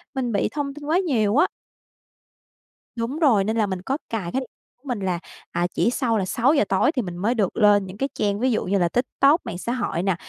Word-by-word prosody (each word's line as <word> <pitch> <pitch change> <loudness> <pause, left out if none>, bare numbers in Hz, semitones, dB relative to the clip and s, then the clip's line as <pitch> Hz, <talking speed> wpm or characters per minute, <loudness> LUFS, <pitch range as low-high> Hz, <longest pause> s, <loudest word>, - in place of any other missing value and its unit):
mình 250 -3 -1
bị 200 - +1
thông 285 -2 -3
tin 295 0 -10
quá 315 +4 +2
nhiều 235 - +1
á. 360 - +5 1.5
Đúng 240 +6 -3
rồi, 245 -11 +4
nên 220 +3 -1
là 220 - +3
mình 190 -2 -4
có 265 +9 -2
cài 200 -7 -3
cái 265 - 0
điện 260 - -8 0.3
của 250 - -44
mình 245 -5 -2
là, 185 -3 -1 0.3
à, 175 +1 0
chỉ - - +2
sau 240 -3 0
là 195 - 0
6:00 255 +9 +3
tối 190 +9 +3
thì 275 -6 -1
mình 175 -5 -6
mới 215 +7 0
được 205 -6 0
lên 205 -2 +5
những 185 +1 -9
cái 270 +5 -1
trang 205 -1 -1
ví 255 +2 +2
dụ 220 - 0
như 200 +2 +1
là 175 -1 +2
TikTok, 275 - +2
mạng 175 - -5
xã 235 - -3
hội 240 -9 -2
nè. 195 -2 +1
225 Hz, 245 wpm, -23 LUFS, 195-265 Hz, 1.5 s, á